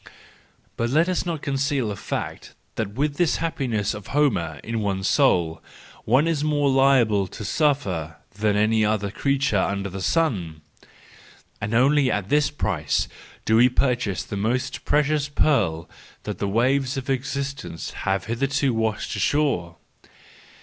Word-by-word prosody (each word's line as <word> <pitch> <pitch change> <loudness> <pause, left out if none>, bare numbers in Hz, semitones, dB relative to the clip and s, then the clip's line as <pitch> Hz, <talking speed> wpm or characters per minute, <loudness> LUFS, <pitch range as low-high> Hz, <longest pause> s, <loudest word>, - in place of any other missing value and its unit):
But 115 0 0
let 155 +6 +3
us 185 -1 -1
not 160 -4 -3
conceal 140 -3 0
the 100 - -3
fact - - -5 0.2
that 110 -3 -3
with 145 +2 -1
this 175 -3 +2
happiness 125 -11 -1
of 105 -2 -9
Homer 100 - 0
in 115 0 -3
one's 95 -2 -1
soul, 80 -2 +2 0.4
one 130 +8 +3
is 155 -3 0
more 145 -2 +2
liable 125 -7 +3
to 105 - -8
suffering 100 - 0 0.2
than 105 0 0
any 110 +1 +3
other 105 -2 0
creature 140 -2 +1
under 100 0 -1
the 95 +1 -6
sun! 90 - 0 1.0
And 105 +3 -2
only 135 +2 +4
at 100 -3 -2
this 150 0 +3
price 90 - -1 0.4
do 110 - +3
we 125 +2 +6
purchase 120 -7 0
the 100 - -6
most 120 +6 -2
precious 150 0 +1
pearl 90 - +1 0.4
that - - -5
the 100 - -1
waves 130 +5 +1
of 130 - -5
existence 135 - -3
have 95 0 -2
hitherto 135 +4 0
washed 110 -1 -1
ashore! 135 - 0
120 Hz, 145 wpm, -23 LUFS, 100-140 Hz, 1.0 s, we